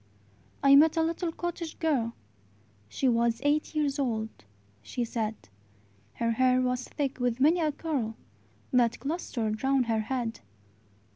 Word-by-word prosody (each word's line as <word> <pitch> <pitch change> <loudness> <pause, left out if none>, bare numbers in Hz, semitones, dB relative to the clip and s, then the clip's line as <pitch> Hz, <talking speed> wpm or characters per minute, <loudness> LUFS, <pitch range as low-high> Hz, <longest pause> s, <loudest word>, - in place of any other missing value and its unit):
I 275 0 +8
met 310 +3 +6
a 325 - +4
little 330 +1 -1
cottage 340 -1 -5
girl: 260 -8 0 0.7
She 265 - 0
was 235 -1 +2
eight 300 +2 +1
years 290 -2 0
old, 225 -5 -1 0.5
she 235 - -3
said; 220 -1 -2 0.8
Her 230 0 0
hair 255 +2 +3
was 250 0 -1
thick 275 -3 -3
with 245 -1 0
many 315 +6 +4
a 310 -2 +1
curl 275 -8 -3 0.6
That 235 -2 +3
clustered 235 -6 -3
round 270 -1 +3
her 225 -1 +1
head. 230 0 -3
255 Hz, 140 wpm, -28 LUFS, 230-300 Hz, 0.8 s, I